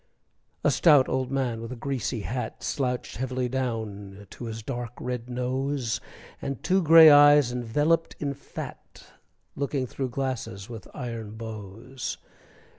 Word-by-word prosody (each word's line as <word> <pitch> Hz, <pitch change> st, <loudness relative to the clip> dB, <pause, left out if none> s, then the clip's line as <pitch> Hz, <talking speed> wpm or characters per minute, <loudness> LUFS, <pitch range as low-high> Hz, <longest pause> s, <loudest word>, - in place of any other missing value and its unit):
A -, -, +4 dB
stout 145 Hz, -6 st, +5 dB
old 130 Hz, -1 st, -1 dB
man 125 Hz, -4 st, -1 dB
with 115 Hz, +1 st, -7 dB
a -, -, -4 dB
greasy 125 Hz, -3 st, -3 dB
hat 125 Hz, +5 st, -4 dB
Slouched 125 Hz, -4 st, -2 dB
heavily 130 Hz, 0 st, -1 dB
down 110 Hz, -6 st, -4 dB
to 120 Hz, -, -8 dB
his 110 Hz, -1 st, -6 dB
dark, 120 Hz, -1 st, -5 dB
red 125 Hz, -1 st, -4 dB
nose, 125 Hz, 0 st, -1 dB, 0.4 s
And 140 Hz, -2 st, -4 dB
two 190 Hz, +2 st, +3 dB
gray 160 Hz, -1 st, +9 dB
eyes 145 Hz, -3 st, +7 dB
enveloped 145 Hz, +8 st, +1 dB
in 140 Hz, -2 st, -2 dB
fat, -, -, -9 dB, 0.5 s
Looking 140 Hz, -1 st, -1 dB
through 130 Hz, +2 st, -4 dB
glasses 125 Hz, -7 st, -4 dB
with 115 Hz, -3 st, -9 dB
iron 115 Hz, -5 st, -5 dB
bows. 110 Hz, +3 st, -6 dB
125 Hz, 135 wpm, -27 LUFS, 115-140 Hz, 0.5 s, gray